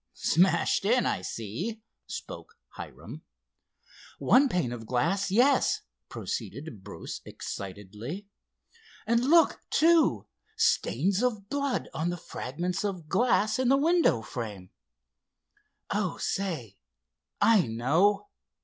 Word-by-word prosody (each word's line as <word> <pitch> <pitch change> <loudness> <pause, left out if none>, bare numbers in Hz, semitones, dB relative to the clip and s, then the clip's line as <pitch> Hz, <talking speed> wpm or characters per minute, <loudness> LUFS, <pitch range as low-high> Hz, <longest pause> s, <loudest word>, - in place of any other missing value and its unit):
"Smashed 185 +4 +2
in—I 235 - +2
see," 115 - -5 0.3
spoke - - -8
Hiram. - - -10 1.0
"One 270 +2 +4
pane 175 - 0
of 115 -2 -7
glass, 185 +11 0
yes," 250 +7 +3 0.3
proceeded 135 -9 -6
Bruce - - -7
excitedly. 105 - -7 0.8
"And 235 +2 +2
look, 335 +1 +5
too, 330 0 +4 0.3
stains 205 - +2
of 215 -5 -1
blood 280 -1 -1
on 165 +2 -1
the 175 - -3
fragments 170 +4 -4
of 185 -6 -4
glass 215 +2 +2
and 255 -1 +2
the 270 - +5
window 320 - +3
frame. 105 -6 -7 1.2
Oh, - - -1
say, 155 - -3 0.6
I 215 - +5
know! 165 - +2
190 Hz, 105 wpm, -28 LUFS, -, 1.2 s, look